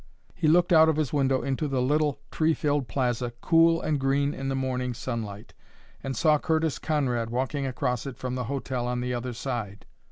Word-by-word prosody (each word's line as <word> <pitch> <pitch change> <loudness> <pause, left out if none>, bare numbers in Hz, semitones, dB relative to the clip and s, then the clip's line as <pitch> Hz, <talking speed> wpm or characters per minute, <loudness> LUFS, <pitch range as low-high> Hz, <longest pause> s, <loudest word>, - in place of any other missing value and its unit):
He - - 0
looked 175 +3 +4
out 160 0 +7
of 160 - +2
his 155 -3 -1
window 135 -2 +2
into 140 +2 -1
the 135 -2 -1
little 145 +2 +1
tree 160 0 +2
filled 145 -3 0
plaza, 120 -2 -1
cool 165 +1 +4
and 155 -3 -1
green 140 +2 +1
in 135 0 -4
the 135 - -1
morning 125 -2 -2
sunlight, 110 -4 -5 0.5
and 135 -1 -4
saw 155 -3 +4
Curtis 160 -3 0
Conrad 125 -7 0
walking 135 +3 -1
across 125 0 -2
it 130 -3 -7
from 125 -1 -4
the 125 -1 -2
hotel 130 -2 -3
on 125 0 -1
the 125 0 -2
other 120 0 -3
side. 115 -5 -5
135 Hz, 195 wpm, -27 LUFS, 125-150 Hz, 0.5 s, out